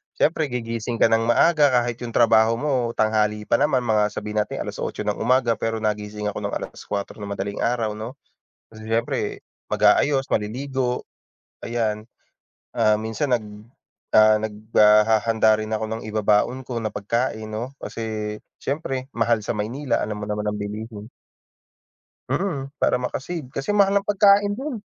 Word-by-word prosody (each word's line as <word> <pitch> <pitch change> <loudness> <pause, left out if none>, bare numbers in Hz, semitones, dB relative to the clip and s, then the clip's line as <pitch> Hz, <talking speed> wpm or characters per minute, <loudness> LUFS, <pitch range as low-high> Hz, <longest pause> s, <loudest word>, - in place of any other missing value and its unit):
siyempre, 155 0 +1
gigising 115 -2 -3
ka 115 - +3
ng 115 0 +2
maaga 150 +4 +5 0.2
kahit 120 -1 -4
yung 120 -2 -7
trabaho 115 -1 +5
mo 125 -3 -1
tanghali 105 -1 +1
pa - - +1
naman, 135 -4 +2
mga 110 -3 +2
sabihin 105 0 -3
natin 105 - -2
8:00 105 - -4
ng 105 0 -2
umaga 120 -1 +2
pero 115 0 -1
nagising 105 0 -2
ako - - -5
ng - - -7
4:00 100 +1 -6
ng 100 - -6
madaling 100 +1 -4
araw 115 -3 0
'no, 110 +5 -7 0.6
kasi 110 - -11
siyempre 115 +1 -1 0.3
mag-aayos, 135 -2 +3
maliligo, 125 +3 -2 0.6
ayan. 110 -2 -2 0.7
Ah, 110 - +4
minsan 110 +5 -2
nag, 115 - -8 0.7
ah, 110 0 +7
naghahanda 110 +1 +3
rin 110 0 -5
ako 110 - -2
ng 110 0 -4
ibabaon 110 +4 +2
ko 125 - -5
na 110 - -3
pagkain 110 +1 -2
'no, 115 +5 -4
kasi 110 -2 -4 0.3
siyempre 135 -2 -3
mahal 115 -1 +2
sa 105 - -2
Maynila 120 +4 -1
alam 105 0 -4
mo 105 - -4
naman 105 0 -2
ang 105 - -1
bilihin. 105 +1 -6 1.2
Mm, 140 -8 -2
para - - +3
maka-save. 130 +3 -4
Kasi 140 +11 -2
mahal 200 0 +4
ang 200 - -14
pagkain 205 0 +4
'don. 265 -3 -4
115 Hz, 150 wpm, -23 LUFS, 105-130 Hz, 1.2 s, ah